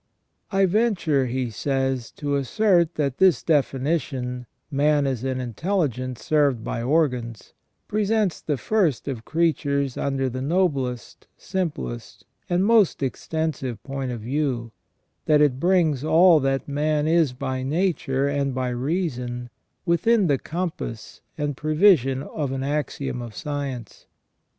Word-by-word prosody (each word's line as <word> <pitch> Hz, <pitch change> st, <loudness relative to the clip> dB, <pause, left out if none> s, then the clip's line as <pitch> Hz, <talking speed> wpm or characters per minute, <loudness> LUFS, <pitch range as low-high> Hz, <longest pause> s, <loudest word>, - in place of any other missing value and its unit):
" -, -, -50 dB
I 195 Hz, -1 st, +3 dB
venture," 180 Hz, -, +1 dB
he 125 Hz, -1 st, -2 dB
says, 135 Hz, 0 st, -1 dB
"to 145 Hz, -1 st, -2 dB
assert 170 Hz, -, +2 dB
that 140 Hz, -4 st, -1 dB
this 190 Hz, -3 st, +4 dB
definition, 135 Hz, -4 st, -1 dB, 0.2 s
'man 145 Hz, +1 st, +2 dB
is 130 Hz, -3 st, -2 dB
an 130 Hz, -1 st, -1 dB
intelligence 130 Hz, -, -2 dB
served 145 Hz, -7 st, +2 dB
by 115 Hz, -, -3 dB
organs,' 125 Hz, -5 st, -1 dB, 0.3 s
presents 210 Hz, -2 st, 0 dB
the 145 Hz, -3 st, -1 dB
first 170 Hz, -, 0 dB
of 120 Hz, -5 st, -4 dB
creatures 140 Hz, -5 st, 0 dB
under 135 Hz, -1 st, -1 dB
the 130 Hz, +1 st, -4 dB
noblest, 135 Hz, -, -1 dB
simplest, 150 Hz, -, -4 dB, 0.2 s
and 180 Hz, +2 st, +2 dB
most 215 Hz, -9 st, +3 dB
extensive 135 Hz, -2 st, -3 dB
point 135 Hz, -2 st, -4 dB
of 120 Hz, -3 st, -5 dB
view; 125 Hz, -2 st, -2 dB, 0.6 s
that 150 Hz, -1 st, +5 dB
it 140 Hz, -4 st, +3 dB
brings 165 Hz, -5 st, +2 dB
all 165 Hz, +1 st, +6 dB
that 135 Hz, -1 st, -1 dB
man 150 Hz, +1 st, 0 dB
is 160 Hz, -5 st, +3 dB
by 130 Hz, 0 st, -3 dB
nature 140 Hz, -2 st, 0 dB
and 140 Hz, -2 st, -1 dB
by 130 Hz, -1 st, -1 dB
reason 125 Hz, -3 st, -3 dB, 0.3 s
within 200 Hz, +6 st, +3 dB
the 140 Hz, -5 st, +2 dB
compass 165 Hz, -9 st, -5 dB, 0.2 s
and 145 Hz, -2 st, -2 dB
prevision 155 Hz, -, +3 dB
of 145 Hz, -3 st, -4 dB
an 135 Hz, 0 st, -3 dB
axiom 140 Hz, -3 st, -2 dB
of 115 Hz, -3 st, -8 dB
science. 140 Hz, -6 st, -5 dB
140 Hz, 130 wpm, -24 LUFS, 130-165 Hz, 0.6 s, all